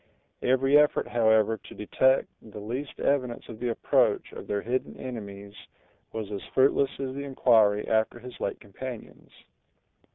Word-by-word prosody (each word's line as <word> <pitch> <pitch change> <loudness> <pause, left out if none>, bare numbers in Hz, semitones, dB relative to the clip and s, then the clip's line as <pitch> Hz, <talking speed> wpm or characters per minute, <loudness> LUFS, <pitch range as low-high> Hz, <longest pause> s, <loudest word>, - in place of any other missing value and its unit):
Every 135 +3 +4
effort, 150 0 +2
however, 110 -1 +3
to - - -14
detect 130 +5 +2
the 110 -2 -12
least 125 +7 -5
evidence 130 -4 0
of 110 -2 -9
the 125 - -1
approach 115 - +1
of - - -9
their 100 -1 -2
hidden 125 +3 -2
enemies 100 -5 -7 0.6
was 110 -2 -5
as 100 - -4
fruitless 135 +1 +4
as 135 -1 -5
the 140 +1 -5
inquiry 110 -6 +3
after 110 +1 +1
his 125 +1 -11
late - - -3
companions. 120 +4 -9
120 Hz, 150 wpm, -27 LUFS, 105-130 Hz, 0.6 s, Every